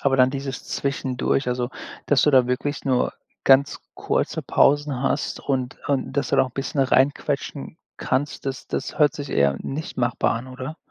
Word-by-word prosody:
aber 135 -1 +2
dann 130 0 +5
dieses 135 -1 -5
zwischendurch, 135 -1 -1
also 125 0 -1 0.4
dass 145 - +4
du 150 - +4
da 130 -3 +5
wirklich 135 +3 -2
nur 130 -2 +1 0.3
ganz 135 +1 +5 0.2
kurze - - -1
Pausen 145 -2 +2
hast 140 +1 -1
und 130 -1 -2
und 135 -2 0
das 140 - -1
dann - - +2
noch - - +5
'n - - -34
bisschen 135 +1 -2
reinquetschen 140 +2 0 0.2
kannst, 145 +1 -2
das 135 -1 -4
das 130 - -4
hört 150 -2 +4
sich 145 -2 -6
eher 70 -1 +2
nicht 155 +5 -5
machbar 120 -2 +1
an, 115 +3 -5
oder? 130 +4 -7
135 Hz, 175 wpm, -23 LUFS, 130-140 Hz, 0.4 s, dann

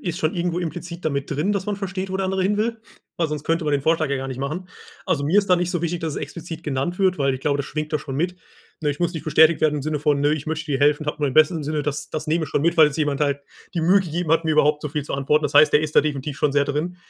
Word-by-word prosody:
ist 175 -1 -4
schon 155 -2 0
irgendwo 175 0 -1
implizit 170 +1 -6
damit 140 -2 -1
drin, 150 +7 0
dass 200 -1 -2
man 205 - -1
versteht, 195 -1 -4
wo 190 - -1
der 195 - -1
andere 190 0 0
hin 205 +2 +1
will, 225 +1 -1 0.4
weil 170 - +1
sonst 150 -1 -4
könnte 165 0 0
man 150 - 0
den 140 - +1
Vorschlag 160 0 +2
ja 140 - 0
gar 135 0 -4
nicht 130 - -6
machen. 155 +7 -4 0.4
Also, 155 -7 0
mir 175 +8 +3
ist 200 -2 +1
da 180 - +6
nicht 175 +1 -1
so 175 - -2
wichtig, 170 0 -1
dass 160 -2 -3
es - - -4
explizit 165 +2 -7
genannt 145 +5 -2
wird, 185 -3 +2
weil 135 -1 +1
ich 130 - -7
glaube, 145 0 +1
das 140 - -3
schwingt 155 0 -4
da 155 - +2
schon 135 -1 -7
mit. 180 +3 -1 0.4
Ne, 150 -2 0
ich 145 - -6
muss 175 0 +1
nicht 160 - -6
bestätigt 160 +1 +5
werden 155 -1 +3
im 145 - -3
Sinne 150 +1 -2
von: 145 -1 +1
„Ne, 145 +1 +3
ich 150 0 -7
möchte 160 0 -3
dir 135 - +1
helfen. 145 +1 +3
Habe 150 - -2
nur 145 - +1
dein 130 - -5
Bestes 155 +2 +5
im 150 - -4
Sinne.“ 150 0 -1
Das 145 0 -4
das 155 0 -5
nehme 160 +1 +1
ich - - -9
schon 145 - 0
mit, 170 +1 +2
weil 155 -2 +8
es 150 - -3
jemand 145 -2 -1
halt 140 -1 +1 0.3
die 170 - 0
Mühe 185 +5 +5
gegeben 175 -2 -3
hat, 165 0 +3
mir 160 - +1
überhaupt 150 0 +3
so 150 - -3
viel 150 0 -3
zu - - -4
antworten. 145 +3 +1
Das 145 - -2
heißt, 150 -1 +7
der 150 - +5
ist 155 -1 -3
da - - +9
definitiv 145 -1 -3
schon 145 -1 +1
sehr 145 0 +3
drin, 150 +5 -3
155 Hz, 325 wpm, -22 LUFS, 145-175 Hz, 0.4 s, da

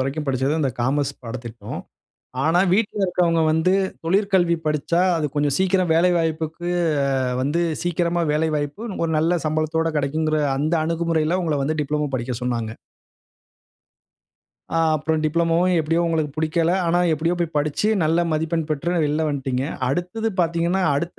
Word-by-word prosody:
வரைக்கும் 140 +3 -2
படிச்சது, 135 +3 +1
அந்த 135 -3 +1
காமர்ஸ் 140 +2 0
பாடத்திட்டம். 115 -1 -7 0.6
ஆனா, 165 +3 +3
வீட்ல 210 +1 +1
இருக்கிறவஙு்க 175 -2 +2
வந்து, 160 +3 +2 0.3
தொழிற்கல்வி 185 -1 +2
படிச்சா, 155 +3 0 0.2
அது 155 - 0
கொஞ்சம் 145 -1 +1
சீக்கிரம் 185 -2 +2
வேலை 180 +2 +4
வாய்ப்புக்கு 160 +1 -2 0.8
வந்து, 150 +5 0 0.2
சீக்கிரமா 175 0 0
வேலை 160 +1 +1
வாய்ப்பு, 145 +8 -4 0.2
ஒரு 165 - -1
நல்ல 170 +2 +2
சம்பளத்தோடு 155 +1 0
கிடைக்குங்கற 155 +2 0 0.2
அந்த 155 +4 0
அணுகுமுறையில, 165 +1 0
உங்கள 155 -4 0
வந்து 155 +2 -1
டிப்ளமோ 150 0 -1
படிக்க 125 +1 -3
சொன்னாங்க. 115 -3 -2 2.0
ஆ - - +2 0.2
அப்புறம் 155 +1 -1
டிப்ளோமோவும் 170 +3 +2
எப்டியும் 165 +3 +1
உங்களுக்கு 155 -3 0
பிடிக்கல. 160 +2 +1
ஆனா, 175 +1 +2
எப்பிடியோ 165 +3 0
போயி 170 -2 -1
படிச்சு 150 +8 0
நல்ல 165 +2 +2
மதிப்பெண் 160 0 -1
பெற்று 170 +4 -1
வெளில 150 +2 0
வந்துடீங்க. 135 -2 -2 0.2
அடுத்தது 180 +9 -2
பார்த்தீங்கன்னா, 170 +3 +1
அடுத்த 170 +5 -3
160 Hz, 140 wpm, -22 LUFS, 150-170 Hz, 2.0 s, வேலை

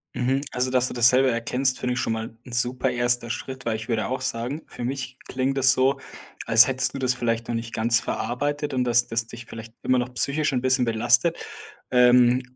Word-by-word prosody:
Mhm, 130 +2 0
also, 125 +1 -1
dass 125 -1 +2
du - - -5
das 120 0 +6
selber 130 +1 +3
erkennst, 125 +3 0
finde 125 0 -2
ich 125 - -3
schon 115 - -1
mal 110 0 -6
ein 125 - -12
super 125 +2 0
erster 120 -1 0
Schritt 130 +2 -6
weil, 115 -1 -1
ich 110 0 -7
würde 110 -4 -1
auch 130 0 -4
sagen, 130 +4 -4
für - - -9
mich 130 0 -5
klingt 135 +1 -2
das 130 -1 +6
so, 135 +2 +1 0.5
als 115 +1 +8
hättest 130 0 -1
du - - -3
das 130 -2 +1
vielleicht 115 -2 -2
noch - - -3
nicht 115 0 -5
ganz 115 +1 +2
verarbeitet 145 +7 -3
und, 125 -1 0
dass 120 0 +3
das 115 0 -2
dich 115 0 -10
vielleicht 115 0 -11
immer 130 0 +2
noch 125 +1 -4
psychisch 145 +4 +1
'n 125 -2 -1
bisschen 130 0 +2
belastet, 120 +9 +2 0.5
ähm, 125 0 +4
125 Hz, 220 wpm, -23 LUFS, 115-130 Hz, 0.5 s, als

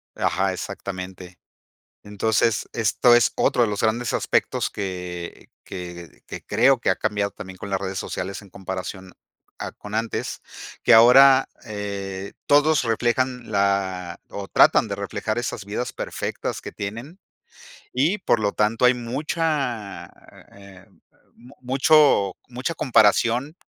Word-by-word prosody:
Ajá, 95 0 0
exactamente. 95 -1 -7 0.7
Entonces, 105 +1 0
esto 115 +2 +3
es 120 - +4
otro 120 - +2
de 115 - +2
los 105 - -3
grandes 115 +2 0
aspectos - - 0
que 90 -3 -6 0.2
que 90 -2 -9
que - - -8
creo - - +3
que - - 0
ha - - +1
cambiado 100 -1 -1
también 95 -3 -10
con 100 - -8
las 95 -1 -1
redes 95 -1 -4
sociales 100 +3 -5
en 100 - -16
comparación 95 0 -7 0.5
a - - -5
con 105 +1 -10
antes. 115 0 -3 0.4
Que - - +4
ahora, 130 +4 +7 0.2
eh, 100 -2 -5
todos 145 +1 +4
reflejan 120 +1 -1
la 95 -3 -1
o 100 -1 -7
tratan 110 - +4
de 100 - -4
reflejar 100 +2 -3
esas 115 -3 -4
vidas 110 +5 -4
perfectas - - -4
que - - -8
tienen, 115 - -7 0.7
y 155 +11 +1
por 120 - +1
lo 105 -1 0
tanto 110 +3 +1
hay 125 0 +6
mucha, 130 - -3 0.5
eh, 100 -2 -15 0.5
mu 125 +4 -17
mucho 135 - +3
mucha 130 +7 -4
comparación, 120 - +2
105 Hz, 135 wpm, -23 LUFS, 95-125 Hz, 0.7 s, ahora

